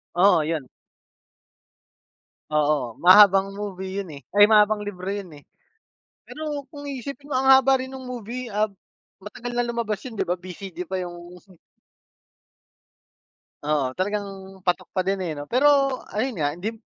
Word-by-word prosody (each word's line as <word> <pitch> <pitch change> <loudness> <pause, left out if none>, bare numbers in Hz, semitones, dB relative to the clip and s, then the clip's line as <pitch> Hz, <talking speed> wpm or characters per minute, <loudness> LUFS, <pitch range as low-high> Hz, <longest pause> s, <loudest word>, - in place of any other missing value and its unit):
Oo, 180 -2 +5
yun. 155 -4 -3 1.8
Oo, 150 -6 0
mahabang 195 +1 +7
movie 195 -1 -5
yun, 190 - -10
eh, 140 - -12
ay, 205 0 +7
mahabang 210 -1 +4
libro 190 -3 -7
yun, 200 -2 -5
eh. 145 - -17 0.8
Pero 300 -3 -5
kung 290 -1 -8
iisipin 280 +2 -7
mo, - - -2
ang 265 - 0
haba 265 0 +6
rin 260 0 -6
nung 260 -1 -8
movie, 245 +1 -6
ah, 210 +1 +1 0.6
matagal 240 +4 -7
na 245 - +2
lumabas 235 -3 -2
yun, 235 -5 -8
di - - 0
ba? 175 - +1
VCD 180 0 -8
pa 190 - -1
yung 175 -1 -5 2.5
Oo, 145 -4 0
talagang 205 +5 -2 0.4
patok 180 - 0
pa 185 -1 -2
din, 195 0 0
eh, 175 -3 -2
ano? 145 - -6
Pero 260 - +4 0.4
ayun 250 +5 -2
nga, 145 - +2
dim 220 +5 -5
205 Hz, 150 wpm, -24 LUFS, 180-245 Hz, 2.5 s, mahabang